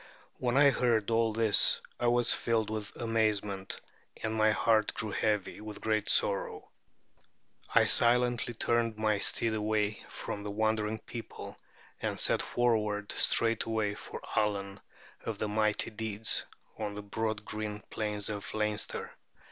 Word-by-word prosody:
When 125 +1 +1
I 140 0 +7
heard 115 -4 +1
all 115 0 +3
this 110 -1 +4 0.2
I 120 - +1
was 120 0 +5
filled 110 -2 0
with 110 -1 -5
amazement, 105 -4 -1 0.4
and 110 -1 -1
my 110 0 +4
heart 110 0 +2
grew 110 -2 -3
heavy 105 -1 -1
with 105 -1 -8
great 110 -1 0
sorrow. 100 -1 +1 1.1
I - - +7
silently 120 0 +2
turned 115 -1 +1
my 110 -1 +1
steed 115 +2 -1
away 105 -1 0
from 105 - -5
the 105 - -5
wondering 110 +1 0
people, 115 +1 -8 0.5
and - - -2
set - - +3
forward 105 -4 0
straightway 110 -2 +2
for 105 - -8
Allen 100 -2 0 0.4
of 110 -2 -3
the 110 - -2
mighty 105 +1 0
deeds, 110 0 0 0.3
on 105 -2 -3
the 105 - -6
broad 110 +1 -3
green 105 -1 -4
plains 105 -2 -2
of 105 -2 -4
Leinster. 105 -1 -2
110 Hz, 140 wpm, -31 LUFS, 105-115 Hz, 1.1 s, I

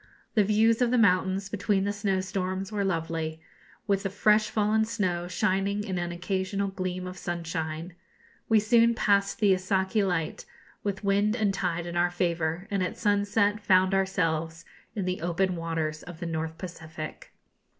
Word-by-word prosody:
The 215 - +4
views 220 +3 +3
of 245 - +4
the 250 - +2
mountains, 190 -2 +3
between 200 -1 0
the 200 +1 0
snowstorms, 190 -1 -2
were 205 -1 -1
lovely, 165 -3 -2 0.5
with 200 -2 +1
the 195 - -2
fresh 210 +2 +3
fallen 215 +1 +2
snow 185 -6 -1
shining 195 +3 0
in 190 -3 -3
an 175 0 -2
occasional 190 +3 -2
gleam 185 -1 -4
of 185 0 -7
sunshine. 165 0 -4 0.6
We 220 -1 +6
soon 230 +2 +4
passed 200 -2 +2
the 205 -3 +5
Isaki 190 +2 +1
light, 175 -5 -1 0.4
with 200 -1 -3
wind 205 +2 +2
and 210 -4 +1
tide 175 -3 -1
in 175 0 -5
our 175 0 +3
favour, 170 -1 -1
and 200 -1 0
at 180 - -2
sunset 205 0 +2
found 190 -2 +3
ourselves 165 -4 0 0.3
in 200 -4 -2
the 185 -2 -2
open 180 +2 0
waters 165 -2 -2
of 175 -2 -10
the 170 - -4
North 160 -1 -3
Pacific. 160 -3 -8
190 Hz, 160 wpm, -27 LUFS, 175-205 Hz, 0.6 s, We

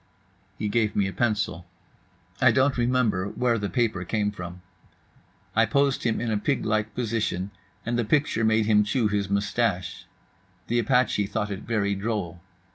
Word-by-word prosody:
He 105 - -2
gave 105 0 +1
me 100 - +2
a 95 - -5
pencil. 105 -7 -1 0.7
I - - +7
don't 135 +1 +3
remember 120 -6 +1
where 115 +2 0
the 100 -1 -2
paper 115 -6 0
came 105 +2 -1
from. 90 -2 -8 0.9
I 115 0 +4
posed 140 -3 +1
him 115 -2 +1
in 115 -1 -2
a 105 - +1
pig 135 +5 -1
like 110 -1 -1
position, 110 -5 -2 0.3
and 120 +1 -1
the - - +2
picture 140 -1 +1
made 110 0 +3
him 105 -1 +4
chew 110 +1 +1
his 100 -2 -1
moustache. 100 -1 -1 0.6
The 120 +1 +1
apache 120 -3 +2
thought 105 +1 -2
it 95 - -4
very 105 -3 +1
droll. 100 -4 -3
110 Hz, 165 wpm, -26 LUFS, 100-120 Hz, 0.9 s, I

